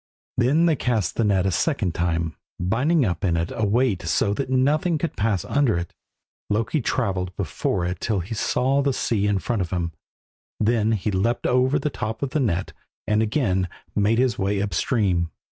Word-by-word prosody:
Then 135 +8 +3
they 165 -2 +3
cast 120 -7 -1
the 115 - +1
net 100 -3 +2
a 95 - +2
second 105 - 0
time, 85 -1 -1 0.2
binding 130 - +2
up 90 -2 -2
in 85 -4 +2
it 85 0 -1
a 115 - -1
weight 110 -3 +2
so 80 +5 +1
that 130 +4 -3
nothing 150 +6 +2
could 165 +2 -3
pass 105 -5 0
under 140 -9 +2
it. 85 0 -5 0.6
Loki 115 +8 0
travelled 95 -7 -1
before 90 0 -1
it 90 0 -3
till 105 -3 0
he 90 +6 -6
saw 130 +5 +1
the 140 -1 +1
sea 105 -5 0
in 100 -1 +2
front 110 +3 -1
of 90 - -2
him. 85 -2 -2 0.7
Then 110 0 +2
he 105 0 -1
leapt 110 +5 0
over 130 +3 +3
the 145 +1 -2
top 110 +2 -4
of 135 - -2
the 155 - 0
net 95 -9 -1 0.3
and 105 +1 +2
again 105 - +1 0.3
made 105 +2 +2
his 125 -2 +1
way 100 +1 0
up 100 +1 -1
the - - -3
stream. 95 -9 +1
105 Hz, 195 wpm, -23 LUFS, 95-130 Hz, 0.7 s, Then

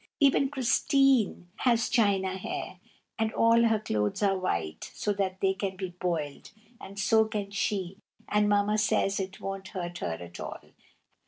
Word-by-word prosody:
Even 275 -1 +4
Christine 270 - +2
has 235 -2 +2
china 195 -5 +2
hair, 185 -1 -5 0.4
and 220 0 +1
all 230 +1 +4
her 225 -1 +3
clothes 105 - -1
are 195 -1 +3
white, 85 - -3
so 205 - -1
they 190 -1 0
can 190 -1 -3
be 185 -1 -4
boiled, 170 -5 -3 0.3
and 200 +1 -11
so 220 +2 +4
can 210 -2 -4
she, 195 -2 -2 0.3
and 210 0 +2
Mamma 205 +1 +2
says 200 -1 +1
it 190 0 -5
won't 195 -1 -5
hurt 175 -3 -5
her 85 - -2
at 85 -1 -10
all. - - -8
195 Hz, 155 wpm, -28 LUFS, 185-220 Hz, 0.4 s, Even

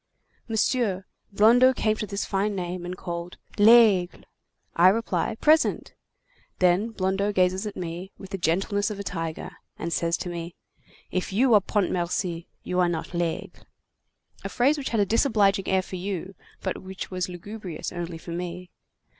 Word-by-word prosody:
"Monsieur, 220 -4 0 0.3
Blondeau 240 +6 +6
came 215 -2 +1
to 215 - -4
this 200 +1 -3
fine 200 +1 -1
name, 180 -1 -4
and 180 +1 -5
called: 170 0 -6 0.2
'Laigle!' 210 -5 +6 0.5
I 175 +2 +6
reply: 225 +2 +1
'Present!' 310 +7 +2 0.6
Then 185 +5 +3
Blondeau 200 -1 0
gazes 185 +1 +1
at 205 - -7
me, 175 +2 -5
with 195 -1 -11
the 195 - -4
gentleness 195 +5 0
of 210 -2 -6
a - - -4
tiger, 165 -4 -4 0.3
and 170 0 -3
says 170 0 0
to 180 - -5
me: 170 0 -6 0.6
'If 185 +1 -2
you 240 +5 +3
are 210 - +7
Pontmercy, 175 -3 -1 0.2
you 180 - -1
are 175 -1 +3
not 165 0 -4
Laigle.' 170 -1 -3 0.8
A - - -4
phrase 270 +5 +3
which 285 -3 -4
has 225 -3 +1
a - - +3
disobliging 205 -3 +2
air 190 0 +2
for 185 - -7
you, 190 0 -4 0.3
but - - -3
which 190 0 -7
was 185 0 -2
lugubrious 180 -1 -7
only 175 -1 -5
for 170 - -9
me. 175 +1 -5
190 Hz, 165 wpm, -26 LUFS, 175-210 Hz, 0.8 s, are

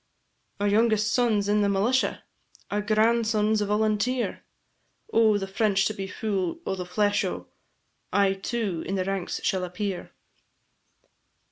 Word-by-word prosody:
"Our 205 - +1
youngest 215 0 +2
son 230 -5 +2
's - - -4
in 210 0 +2
the 200 - +2
militia, 220 +7 +1 0.5
Our 205 - 0
eldest 210 +1 0
grandson 220 -1 +2
's 210 - +1
volunteer: 215 +4 0 0.7
O' 220 -2 +5
the 195 - -3
French 195 0 +1
to 215 - 0
be 195 -2 -5
fu' 190 -4 -2
o' - - -1
the 180 -2 -5
flesh 205 +2 +1
o', - - -4 0.6
I 200 -1 +3
too 195 -3 -3
in 195 - -1
the 185 -1 -1
ranks 195 -2 -3
shall 190 -1 0
appear." 180 +1 -4
205 Hz, 150 wpm, -26 LUFS, 195-220 Hz, 0.7 s, O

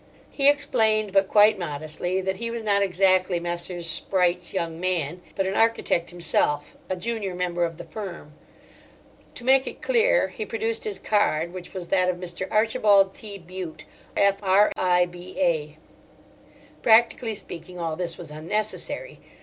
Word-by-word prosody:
He 280 0 +4
explained—but 215 -8 +2
quite 210 0 +5
modestly—that 175 +4 -2
he 230 +3 -3
was 230 -1 -4
not 200 -2 +2
exactly 185 -1 +2
Messrs. 175 0 -4
Spreight's 175 +2 0
young 165 -3 -3
man, 175 -2 -2
but 195 - 0
an 190 - -1
architect 225 -6 +1
himself, 150 -4 0
a 185 - 0
junior 205 -1 -3
member 175 -1 -1
of 165 -1 -6
the - - -8
firm. 180 -8 -8 1.0
To - - -7
make 265 +1 +4
it - - -7
clear - - +3
he - - -6
produced 455 0 -2
his 425 -2 -3
card, 170 -5 +1
which 185 +1 -9
was 180 -2 -6
that 185 -1 +3
of 180 - 0
Mr. 180 +1 -5
Archibald 210 -3 +4
T. 205 -2 -9
Bute, 180 -2 -8 0.3
F.R.I.B.A. 180 -5 +1 1.0
Practically 225 0 +4
speaking, 180 -2 -7
all 165 -2 -2
this 170 -1 -3
was 165 -4 -9
unnecessary. 210 - -4
185 Hz, 140 wpm, -25 LUFS, 175-215 Hz, 1.0 s, quite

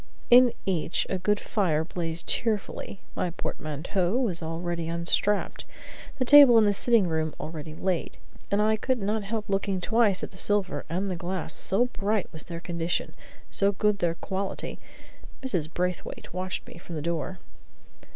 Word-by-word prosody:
In 245 0 +8
each 170 -3 0
a 190 - 0
good 205 +3 +1
fire 170 -7 +1
blazed 165 -1 -4
cheerfully; 210 -3 -2
my 180 - 0
portmanteau 175 - -2
was 205 -10 0
already 165 +1 -3
unstrapped, 170 +5 0 0.5
the 255 - 0
table 280 -3 +9
in 220 - +6
the 205 - +3
sitting 225 -2 +4
room 160 -1 -1
already 155 -1 -6
laid; 185 0 -2 0.3
and 205 +1 +2
I 220 0 +3
could 255 +3 0
not 210 +2 0
help 215 +1 -3
looking 195 -1 0
twice 215 -1 +2
at - - -4
the 185 - -13
silver 205 -1 +1
and 190 +3 -1
the - - -2
glass, 175 -2 -4
so 200 +6 +2
bright 210 -4 -1
was 160 - -8
their 170 -1 -6
condition, 170 0 -2 0.4
so 200 0 +2
good 210 +1 +1
their 170 -2 +1
quality. 195 +2 -4 0.6
Mrs. 175 - 0
Braithwaite 180 -1 -4
watched 185 +1 -3
me - - -11
from 170 -1 -8
the 150 - -4
door. 170 +2 -2
185 Hz, 160 wpm, -27 LUFS, 170-210 Hz, 0.6 s, table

